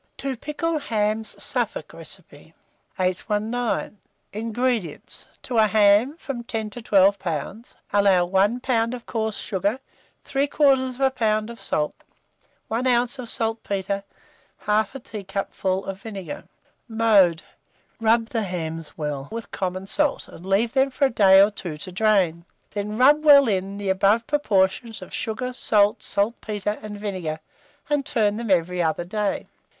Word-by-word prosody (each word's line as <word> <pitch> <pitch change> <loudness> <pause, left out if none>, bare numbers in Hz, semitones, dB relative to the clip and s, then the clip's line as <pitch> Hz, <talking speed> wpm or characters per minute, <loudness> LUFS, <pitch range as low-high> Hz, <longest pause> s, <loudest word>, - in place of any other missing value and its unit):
TO 275 -1 -3
PICKLE 305 +5 -2
HAMS 220 -4 -1
(Suffolk - - -2
Recipe). - - -10 0.4
819. 210 +4 -1 0.3
INGREDIENTS. 225 - -2 0.2
To 240 -3 0
a 215 - +6
ham 215 +7 +4
from 270 -7 -5
10 220 -2 -4
to 240 - -8
12 200 -2 +4
lbs., 180 - -5 0.2
allow 195 -3 +4
1 195 +7 +2
lb. 235 -1 +1
of 240 - -11
coarse 220 -2 -2
sugar, 200 +5 -1 0.5
3/4 275 -2 +2
lb. 225 -5 +1
of 235 - -12
salt, 150 0 -1 0.7
1 235 +4 -1
oz. 245 +1 +2
of 240 -2 -6
saltpetre, 200 -4 -2 0.6
1/2 215 +3 +1
a - - -5
teacupful 195 -3 -3
of 195 0 -6
vinegar. 210 +6 -7 0.4
Mode. 210 -7 +4 0.6
Rub 225 +1 +3
the 230 - -1
hams 165 -5 -5
well 145 -3 -4
with 230 0 -6
common 185 0 -3
salt, 295 +8 0
and 170 - -13
leave 200 +5 +1
them 265 0 +3
for 275 +2 +1
a 265 - +1
day 195 -4 +6
or 200 +2 +6
two 175 -6 -6
to 185 +5 -6
drain; 180 -4 +2 0.3
then 210 +1 -4
rub 290 +5 +5
well 285 -3 +8
in, 195 -1 -1
the 200 -1 -3
above 200 +4 +3
proportion 220 -5 +1
of 185 - -11
sugar, 250 +3 -3
salt, 210 -4 +2
saltpetre, 210 -1 -1
and 210 -1 -7
vinegar, 185 -7 -4 0.5
and 290 -1 +1
turn 215 -7 +1
them 235 -1 -4
every 180 -1 +2
other 165 +1 0
day. 210 +2 -2
215 Hz, 145 wpm, -24 LUFS, 190-235 Hz, 0.7 s, well